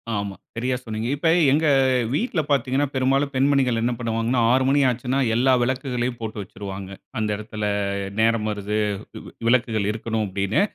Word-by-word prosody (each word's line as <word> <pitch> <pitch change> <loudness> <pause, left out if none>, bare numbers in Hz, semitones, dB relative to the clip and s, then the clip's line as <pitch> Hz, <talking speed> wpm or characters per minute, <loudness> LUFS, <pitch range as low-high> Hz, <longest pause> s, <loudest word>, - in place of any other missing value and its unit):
ஆமா. 100 -1 -3 0.2
சரியா 125 +3 -1
சொன்னீங்க. 110 0 -4
இப்ப 155 +3 +1 0.2
எங்க 155 +3 +3 0.5
வீட்ல 180 - 0
பாத்தீங்கணா, 140 0 +2
பெரும்பாலும் 135 +2 +1
பெண்மணிகள் 130 -3 +2
என்ன 120 +2 +1
பண்ணுவாங்கணா, 115 +1 0
6 130 +1 +3
மணி 140 +1 +3
ஆச்சுன்னா, 125 +2 -1 0.2
எல்லா 130 +2 +4
விளக்குகளையும் 125 -1 -2
போட்டு 110 -1 -4
வச்சுருவாங்க. 95 0 -8 0.3
அந்த 110 -1 0
எடத்துல 105 0 -6 0.6
நேரம் 115 -1 +2
வருது, 105 0 -3 0.7
விளக்குகள் 115 -4 +2
இருக்கணும் 110 0 -2
அப்டின்னு. 100 - 0
120 Hz, 140 wpm, -23 LUFS, 110-130 Hz, 0.7 s, எல்லா